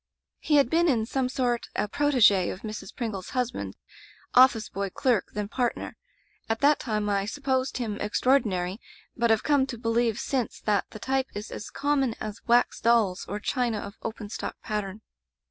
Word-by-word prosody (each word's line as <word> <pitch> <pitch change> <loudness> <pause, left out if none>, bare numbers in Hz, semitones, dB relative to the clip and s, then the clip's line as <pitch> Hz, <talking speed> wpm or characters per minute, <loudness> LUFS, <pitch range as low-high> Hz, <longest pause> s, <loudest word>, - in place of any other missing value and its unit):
"He 305 - +1
had 280 -4 +5
been 335 +6 +3
in 225 -6 +2
some 255 +2 -1
sort 245 -3 -1
a - - 0
protege 220 -8 +4
of 185 - -6
Mrs. 215 -3 -6
Pringle's 215 -6 -4
husband 250 -1 -2 0.3
— - - -27
office 225 -4 -4
boy, 200 0 -3
clerk, 240 0 +1
then 210 -1 -3
partner. 245 +2 -2 0.5
At 225 0 0
that 290 +1 +5
time 215 -3 -2
I 200 -1 +1
supposed 265 +1 -1
him 220 -5 -3
extraordinary, 210 -4 +1 0.4
but 235 -2 +1
have 220 -1 +3
come 285 -3 +3
to 240 - -6
believe 230 -1 +1
since 255 -4 -2
that 205 -3 0
the 215 - -10
t3rpe 265 +3 0
is 210 +2 -6
as 210 - -6
common 275 -5 0
as 215 -1 -6
wax 240 +1 +3
dolls, 225 -6 +2
or 205 - -4
china 240 -1 0
of 200 -1 -6
'open 220 -2 -6
stock' - - -5
pattern. 210 -1 -3
230 Hz, 180 wpm, -27 LUFS, 210-260 Hz, 0.5 s, had